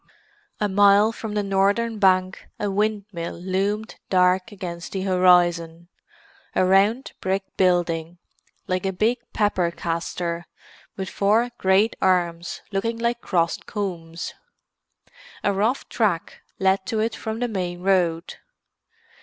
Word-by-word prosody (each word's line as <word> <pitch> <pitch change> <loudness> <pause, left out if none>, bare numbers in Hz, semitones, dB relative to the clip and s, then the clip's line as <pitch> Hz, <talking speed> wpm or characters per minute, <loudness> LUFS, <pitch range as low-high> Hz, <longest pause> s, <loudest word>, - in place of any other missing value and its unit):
A 210 - +1
mile 205 +2 +5
from 220 -2 -6
the 210 - +1
northern 200 +3 +1
bank 185 -1 +2
a 205 -1 -1
windmill 205 -4 -2
loomed 195 +4 -2
dark 185 +2 +3
against 175 -4 -7
the 190 -1 -2
horizon; 175 -2 +3 0.7
a 185 - +3
round 200 +7 +3
brick 190 +1 0
building, 175 -2 +1 0.5
like 185 0 -1
a 195 - 0
big 225 +6 +1
pepper 200 -5 +1
castor, 170 0 -3 0.5
with 190 -1 -3
four 220 +6 +2
great 190 +4 +3
arms 175 -2 0
looking 230 +4 -1
like 235 +1 -1
crossed 170 -3 0
combs. 170 -5 -4 1.1
A 200 - +2
rough 220 +7 0
track 200 -8 -1 0.2
led 190 0 +2
to 220 - -1
it 225 +1 0
from 220 0 -4
the 245 +1 -1
main 180 -5 -3
road. 175 -3 +1
190 Hz, 125 wpm, -23 LUFS, 175-210 Hz, 1.1 s, mile